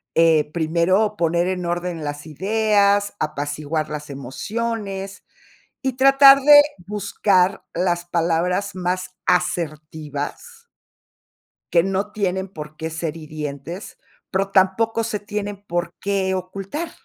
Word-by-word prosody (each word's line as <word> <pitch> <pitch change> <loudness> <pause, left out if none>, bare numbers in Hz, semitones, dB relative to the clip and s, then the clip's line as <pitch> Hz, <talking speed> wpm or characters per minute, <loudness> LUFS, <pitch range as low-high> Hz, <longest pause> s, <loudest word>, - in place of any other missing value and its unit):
eh, 160 -2 +4
primero 175 +6 +1
poner 170 0 +1
en 185 -1 -2
orden 175 -2 -3
las 145 +1 -5
ideas, 205 +4 +2
apaciguar 150 +1 -2
las 150 -1 -6
emociones, 195 - -4 0.6
y 265 -2 0
tratar 275 +1 +7
de 290 +1 +9 0.3
buscar 195 -2 +1
las 175 0 0
palabras 175 +3 0
más 185 0 -2
asertivas 160 - -3 1.1
que 170 -1 +5
no 195 +2 -2
tienen 190 -2 -1
por 155 -3 -9
qué 160 0 -4
ser 160 0 -4
hirientes, 155 +3 -7 0.3
pero 195 +1 0
tampoco 220 +4 +2
se 215 -2 -2
tienen 205 -1 -5
por 175 0 -2
qué 195 -1 0
ocultar. 195 - -5
180 Hz, 115 wpm, -22 LUFS, 160-205 Hz, 1.1 s, de